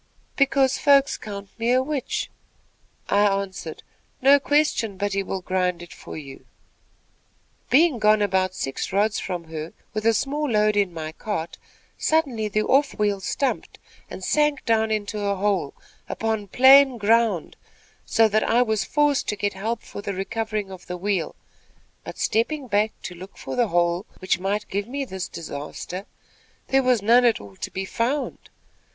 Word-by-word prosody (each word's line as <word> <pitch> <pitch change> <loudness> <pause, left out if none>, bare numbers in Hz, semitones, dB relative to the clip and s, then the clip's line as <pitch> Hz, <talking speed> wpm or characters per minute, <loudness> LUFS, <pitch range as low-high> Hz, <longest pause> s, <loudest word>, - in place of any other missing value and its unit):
"'Because 275 -1 +2
folks 280 -2 +4
count 200 -2 -8
me 230 +1 +1
a 255 +1 +3
witch.' 285 -2 -3 0.8
"I 200 - +2
answered: 195 -5 -1 0.4
"'No 275 +2 +6
question 280 -8 +1
but 205 0 -1
he 195 - +1
will 190 -1 -4
grind 180 -2 -1
for - - -9
you.' 140 -3 -10 1.2
"Being 295 -2 +4
gone 215 0 +4
about 185 -1 +1
six 135 - -4
rods 205 +3 +1
from 180 -3 -4
her, 160 0 -7 0.2
with 215 0 -1
a 230 - +4
small 290 +4 -1
load 210 -2 +2
in 200 -3 +2
my 160 -2 -6
cart, 170 -1 -5 0.4
suddenly 270 -9 +1
the 215 +1 0
off 275 +4 +2
wheel 205 -2 +1
stumped 270 +8 -2 0.3
and - - -8
sank 295 -2 +1
down 220 -1 +2
into 210 -1 -2
a 200 -1 0
hole, 190 -7 -1 0.3
upon 220 -2 -2
plain 265 +3 +7
ground, 220 -4 +2 0.5
so 225 0 +3
that 215 0 +1
I 240 +2 +3
was 220 -3 0
forced 295 -1 +1
to 210 - -1
get 205 0 -1
help 220 +4 -3
for - - -8
the 200 -1 -4
recovering 210 +1 -3
of 185 -1 -11
the 180 - -4
wheel; 190 -3 -1 0.7
but, - - -8
stepping 265 +6 0
back 210 0 +2
to 180 - -6
look 185 +3 -12
for - - -6
the 240 -2 +2
hole 175 0 +1
which 185 -1 0
might 200 +3 -2
give 200 +2 -3
me 275 +2 -3
this 190 -6 -5
disaster, 165 +5 -7 0.6
there 270 0 +4
was 250 -5 +2
none 235 +4 +5
at 235 -2 +3
all 100 -1 -12
to - - -5
be 190 0 -4
found. 250 +8 -2
210 Hz, 165 wpm, -24 LUFS, 190-250 Hz, 1.2 s, plain